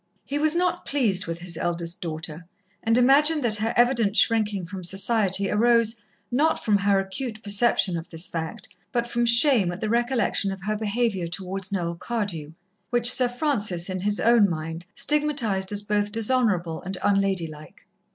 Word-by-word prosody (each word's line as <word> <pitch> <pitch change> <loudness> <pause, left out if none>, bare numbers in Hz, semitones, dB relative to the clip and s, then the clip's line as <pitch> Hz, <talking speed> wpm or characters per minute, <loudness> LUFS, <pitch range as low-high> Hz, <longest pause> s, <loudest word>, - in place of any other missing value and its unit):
He 285 +1 -3
was 310 +1 +2
not 360 0 0
pleased 215 -11 0
with 165 0 -4
his 175 -1 -7
eldest 170 0 -3
daughter, 160 0 -6 0.3
and 225 +1 +2
imagined 290 +4 +4
that 220 -3 0
her 220 +2 -1
evident 235 -4 +3
shrinking 210 -5 +2
from 185 +1 -8
society 195 +1 0
arose, 230 0 +2 0.3
not 300 +6 +1
from 210 -2 +3
her 200 0 +2
acute 215 +4 -5
perception 205 -3 +2
of 165 +1 -6
this 165 +1 -6
fact, 160 -2 -6 0.2
but 240 -1 0
from 240 0 -1
shame 235 - +4
at 175 - -7
the 215 -1 -2
recollection 235 -3 0
of 195 0 -8
her 215 +1 -1
behaviour 215 -3 -1
towards 190 +2 -4
Noel 175 -3 -2
Cardew, 170 -6 -4 0.4
which 240 0 +5
Sir 250 0 +3
Francis 210 - -1
in 185 - -3
his 205 +2 0
own 230 -3 +4
mind 165 +1 -5
stigmatized 260 -11 0
as 205 0 0
both 205 0 -1
dishonourable 210 -8 0
and 190 +1 -5
unladylike. 190 -7 -1
205 Hz, 165 wpm, -24 LUFS, 180-240 Hz, 0.4 s, which